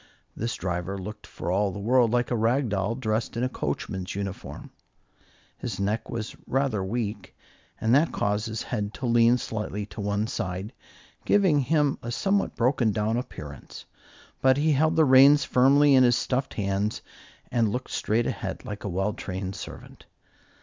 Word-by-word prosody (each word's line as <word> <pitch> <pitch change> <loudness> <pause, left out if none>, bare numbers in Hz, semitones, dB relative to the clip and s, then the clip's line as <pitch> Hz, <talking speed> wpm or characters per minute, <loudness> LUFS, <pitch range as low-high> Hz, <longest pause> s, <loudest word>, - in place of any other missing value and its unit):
This 115 +1 -3
driver 90 +1 -3
looked 105 +3 -8
for 85 - -5
all 100 +2 +2
the 105 - -7
world 120 +3 +3
like 120 +2 0
a - - +2
rag 120 +3 +1
doll 100 +3 -1
dressed 115 -1 -2
in 120 - 0
a - - +2
coachman's 95 -6 -4
uniform. 100 -1 -6 0.9
His 110 -6 -5
neck 105 +3 -1
was 110 -2 -5
rather 130 -7 0
weak, 105 0 -4 0.4
and 110 +2 +2
that 150 +5 +4
caused 105 +1 -1
his 110 0 -4
head 105 0 -3
to 130 - -5
lean 120 0 +4
slightly 105 -3 -4
to 105 - -8
one 100 +1 0
side, 95 -4 -4 0.5
giving 190 -8 +3
him 145 +1 +1
a 120 - -6
somewhat 195 +10 0
broken 125 -2 +2
down 110 +2 0
appearance; 75 - -7 0.6
but 130 0 +4
he 155 +2 +2
held 155 +3 +2
the 160 -1 +5
reins 140 +2 +7
firmly 140 +3 +5
in 130 -1 +7
his 120 -1 +5
stuffed 130 +2 -2
hands 100 +1 -1 0.5
and 115 -3 +2
looked 125 +5 -4
straight 115 +2 0
ahead, - - -4
like 105 0 -6
a 100 - -3
well 95 +3 -1
trained 95 0 -5
servant. - - -10
115 Hz, 170 wpm, -26 LUFS, 100-130 Hz, 0.9 s, reins